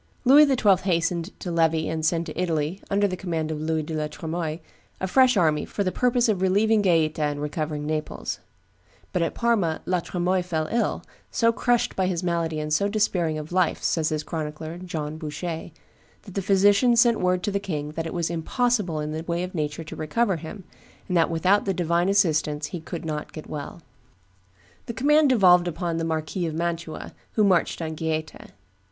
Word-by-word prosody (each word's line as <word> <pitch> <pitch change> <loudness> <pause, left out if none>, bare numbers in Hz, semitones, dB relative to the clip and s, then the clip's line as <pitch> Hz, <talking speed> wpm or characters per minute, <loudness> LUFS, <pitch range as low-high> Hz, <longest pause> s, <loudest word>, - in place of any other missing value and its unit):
Louis 290 +4 +8
XII. 225 -8 +4
hastened 170 0 -1
to 180 - -4
levy 160 -1 +2
and 160 0 -3
send 165 +1 +1
to 155 - -7
Italy, 165 0 -1
under 205 0 +2
the 185 - -3
command 165 -4 -3
of 150 -1 -4
Louis 160 0 -1
de 160 - -6
la 155 -1 -1
Tremoille, 160 +1 -4 0.4
a - - -1
fresh 250 +4 +4
army 155 -4 +2
for 200 - -3
the 185 - 0
purpose 245 +1 +2
of 205 -4 0
relieving 205 +3 +3
Gaeta 160 -5 +2
and 145 -1 0
recovering 150 0 -3
Naples; 155 0 -3 0.7
but 180 - +1
at 165 - -1
Parma 210 -9 +1
La 180 -1 +1
Tremoille 180 +2 0
fell 165 -3 -2
ill, 235 0 0 0.3
"so 230 -1 +2
crushed 240 0 +1
by 190 -1 +1
his 180 -1 -2
malady 165 -3 -1
and 150 0 -2
so 200 +6 +2
despairing 185 -7 0
of 155 +1 -7
life," 180 -2 +1
says 165 -6 +1
his 155 -1 -2
chronicler, 155 +1 -5
John 155 -4 -5
Bouchet, 160 +2 -5 0.5
"that 195 - -12
the 195 - -1
physicians 205 +5 +4
sent 235 -1 +4
word 180 0 +1
to 205 - 0
the 200 - 0
king 150 -7 -4
that 165 +1 -4
it - - -6
was 170 -1 -1
impossible 185 0 0
in 150 0 -3
the 155 +1 -3
way 170 +1 -1
of 180 - -6
nature 150 -1 -3
to 155 - -9
recover 195 +5 0
him, 165 +5 -8 0.4
and 180 - -1
that 165 -1 +4
without 180 +5 +2
the 195 -2 0
divine 170 +1 +1
assistance 155 -6 +2
he 175 - -3
could 165 +1 -7
not 155 -1 -4
get 155 - -8
well." 150 +2 -7 1.0
The 235 - -4
command 295 +3 +4
devolved 180 -7 +5
upon 170 0 -2
the 165 - -2
Marquis 160 +2 -2
of 155 - -4
Mantua, 170 -1 -4 0.2
who 215 - +3
marched 180 -3 +2
on 160 0 -3
Gaeta. 155 -1 -4
170 Hz, 195 wpm, -25 LUFS, 155-195 Hz, 1.0 s, Louis